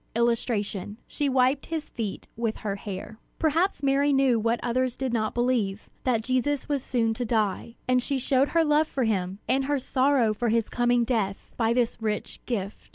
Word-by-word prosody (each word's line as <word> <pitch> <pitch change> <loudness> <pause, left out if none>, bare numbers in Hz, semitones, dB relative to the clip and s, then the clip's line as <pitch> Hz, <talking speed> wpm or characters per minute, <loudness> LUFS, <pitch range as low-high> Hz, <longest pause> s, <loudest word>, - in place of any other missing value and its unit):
[Illustration: 220 -4 -1
She 290 -1 -1
wiped 260 +1 +2
his 320 -2 -3
feet 220 -5 -5
with 225 -1 -1
her 200 -1 0
hair] 200 +2 -7 0.2
Perhaps 325 +1 +1
Mary 280 +1 +3
knew 270 -4 +3
what 230 +2 +1
others 250 +1 0
did 260 -2 -2
not 215 -2 0
believe, 235 -5 0
that 235 -4 +2
Jesus 255 +3 0
was 285 -3 -1
soon 230 -3 +1
to 245 - -3
die; 220 0 -1
and 255 0 +3
she 275 +2 -1
showed 265 +1 +2
her 335 -1 +3
love 300 0 +3
for 265 - -1
him, 190 -4 0
and 270 +1 +2
her 290 +1 +1
sorrow 260 -3 +2
for 235 +2 -1
his 225 -1 +1
coming 240 0 +2
death, 220 -5 -2
by 225 -1 +1
this 235 -1 +1
rich 215 -1 -3
gift. 205 -4 -4
240 Hz, 185 wpm, -26 LUFS, 220-270 Hz, 0.2 s, Mary